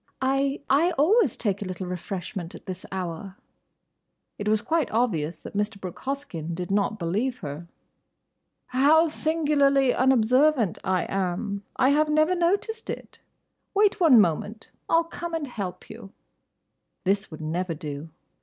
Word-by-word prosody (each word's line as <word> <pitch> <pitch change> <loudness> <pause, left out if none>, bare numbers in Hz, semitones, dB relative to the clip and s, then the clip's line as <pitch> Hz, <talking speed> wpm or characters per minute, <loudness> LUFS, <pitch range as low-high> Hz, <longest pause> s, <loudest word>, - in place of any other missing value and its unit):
"I—I 275 +4 +1
always 350 - +3
take 200 -3 -1
a - - -3
little 185 0 -5
refreshment 180 0 -5
at - - -12
this 185 -1 -7
hour." 185 +1 -5 1.0
It 205 - -3
was 215 0 +2
quite 320 -4 0
obvious 170 -9 0
that - - -9
Mr. 205 0 -2
Brooke 185 -3 -7
Hoskyn 260 - -4
did 180 +1 -5
not 205 +2 +1
believe 210 +9 -1
her. 145 +4 -6 1.0
"How 290 +6 +5
singularly 290 -4 +2
unobservant 255 - +3
I 185 -2 +1
am! 195 +2 -2
I 260 - +3
have 300 +2 +3
never 310 +3 +3
noticed 400 +6 0
it. - - -7 0.6
Wait 410 0 +3
one 310 -10 +7
moment. 205 +4 0 0.2
I 330 - +5
'll 335 - +3
come 335 0 -6
and 320 -3 -2
help 200 -8 -6
you." 215 -3 -11 0.9
This 195 +2 0
would 155 -1 -9
never 165 +2 -2
do. 150 +1 -6
220 Hz, 145 wpm, -25 LUFS, 185-290 Hz, 1.0 s, one